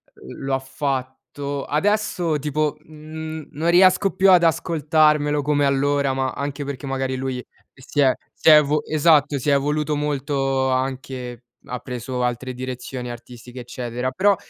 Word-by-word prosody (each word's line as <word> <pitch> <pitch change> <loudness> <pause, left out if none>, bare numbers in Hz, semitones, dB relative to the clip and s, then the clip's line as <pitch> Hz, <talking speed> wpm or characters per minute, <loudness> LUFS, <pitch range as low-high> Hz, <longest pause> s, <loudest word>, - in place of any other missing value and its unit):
uhm, 65 - -11
lo 135 - -1
ha - - -1
fatto. 135 +1 -4
Adesso, 175 -2 0
tipo, 150 +1 -1
mhmm, 155 0 -8
non 160 +4 -1
riesco 185 +2 +5
più 190 0 +5
ad 175 -2 +6
ascoltarmelo 150 -2 +2
come 145 0 +1
allora, 140 0 +1
ma 130 0 -1
anche 140 0 -4
perché, 140 0 -6
magari, 135 -1 -2
lui 130 -1 -4 0.3
si 140 +2 -2
è 130 -2 +5 0.2
si - - +3
è 155 - +10
evu 150 0 +2
esatto, 150 -2 +3
si 145 - -1
è - - +4
evoluto 150 +2 0
molto 135 -2 -1
anche, 130 -1 -3 0.2
ha 125 -1 -5
preso 125 0 -4
altre 125 +1 -2
direzioni 125 0 -6
artistiche, 120 +1 -10
eccetera. 125 +1 -4
Però, 200 +7 +3
140 Hz, 155 wpm, -22 LUFS, 130-150 Hz, 0.3 s, è